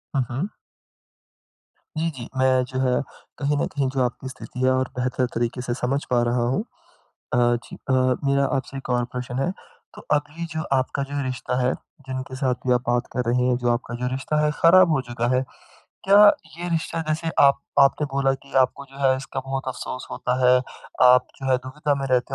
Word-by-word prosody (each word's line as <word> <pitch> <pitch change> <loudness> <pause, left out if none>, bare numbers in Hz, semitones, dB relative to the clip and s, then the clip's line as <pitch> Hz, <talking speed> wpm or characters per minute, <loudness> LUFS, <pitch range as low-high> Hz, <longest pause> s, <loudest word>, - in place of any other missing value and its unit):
हाँ, 135 - +3
हाँ। 145 +12 -2 1.5
जी, 165 +1 0
जी। 125 -4 -8
मैं 130 -1 +3
जो 130 +1 -4
है 125 -1 +2 0.4
कहीं 145 0 0
न - - +1
कहीं 140 -2 0
जो 135 - +1
आपकी 125 +1 -3
स्थिति 130 -1 -10
है 130 0 +3
और 130 0 +1
बेहतर 125 0 0
तरीके 120 +2 -1
से 120 -1 -2
समझ 130 +3 -1
पा 120 -1 +3
रहा 120 0 +1
हूँ। 195 - 0 0.7
अ, 125 - +3
जी 120 0 +1
अ, 130 - +3 0.3
मेरा 140 0 +3
आपसे 135 0 -4
एक 135 - -8
और 120 -1 +1
प्रश्न 125 0 -5
है, 155 +7 0 0.4
तो - - -10
अभी 150 +3 -3
जो 160 0 -2 0.2
आपका 130 +2 -1
जो 140 +1 -3
रिश्ता 125 -1 -3
है 125 - +2 0.3
जिनके 130 0 -5
साथ 130 -1 +1
भी 125 - +5
आप 125 - +2
बात 120 0 +1
कर 125 - 0
रहे 125 +1 +2
हैं 125 - +3
जो 120 - +2
आपका 120 0 -2
जो 125 - 0
रिश्ता 135 +3 -1
है 150 - +2
ख़राब 180 +1 +7
हो 145 -4 +2
चुका 120 0 -1
है। 130 - +2 0.6
क्या 205 +2 +8 0.3
ये 175 +1 -4
रिश्ता 165 0 -1
जैसे 160 +1 -1
आप 140 0 +5 0.2
आपने 140 +2 +4
बोला 135 -1 +2
कि 140 - -17
आपको 140 +2 -3
जो 135 - -13
है 130 - +4
इसका 135 0 -5
बहुत 135 0 -4
अफसोस 130 0 -5
होता 125 - -1
है। 125 0 +7 0.5
आप 125 0 +7
जो 135 -1 -3
है 130 - +5
दुविधा 145 +3 -2
में 135 -1 -3
रहते 125 -1 +1
130 Hz, 205 wpm, -23 LUFS, 125-140 Hz, 1.5 s, क्या